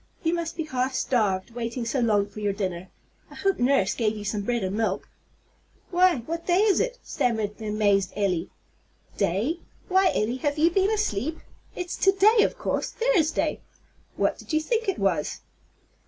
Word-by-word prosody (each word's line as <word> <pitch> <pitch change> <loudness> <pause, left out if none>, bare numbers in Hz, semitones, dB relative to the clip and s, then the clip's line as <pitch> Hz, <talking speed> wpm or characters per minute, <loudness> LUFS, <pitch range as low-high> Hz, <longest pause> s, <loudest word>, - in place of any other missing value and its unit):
You 330 0 +1
must 335 -1 -3
be 325 - -1
half 260 -3 -2
starved, 210 -6 0
waiting 235 +1 -4
so 245 +4 -1
long 210 -4 +3
for 205 +1 -11
your 205 -1 0
dinner. 185 -3 -4 0.4
I - - -13
hope 390 -1 0
nurse 245 -6 +3
gave 220 -2 0
you 210 - -6
some 205 +1 -1
bread 235 +1 -1
and 190 +1 -2
milk." 210 -3 -1 0.8
"Why, 355 -8 +3
what 335 +1 -5
day 355 0 +4
is 420 -3 +4
it?" - - -1
stammered 220 -3 -1
the 220 - -5
amazed 205 -2 +2
Elly. 190 -4 0 0.7
"Day? 205 - 0 0.3
Why, 380 +1 +4
Elly, 230 +4 0
have 290 +2 -1
you 325 +3 +4
been 385 +3 +2
asleep? 320 - -1 0.4
It's 360 -1 -4
to 390 - +4
day, 425 +3 +5
of - - +1
course, - - -1
Thursday. 400 -10 +1 0.5
What - - 0
did - - -8
you 310 - +4
think 450 +6 -1
it 390 - -1
was?" 180 -7 0
245 Hz, 180 wpm, -26 LUFS, 205-345 Hz, 0.8 s, day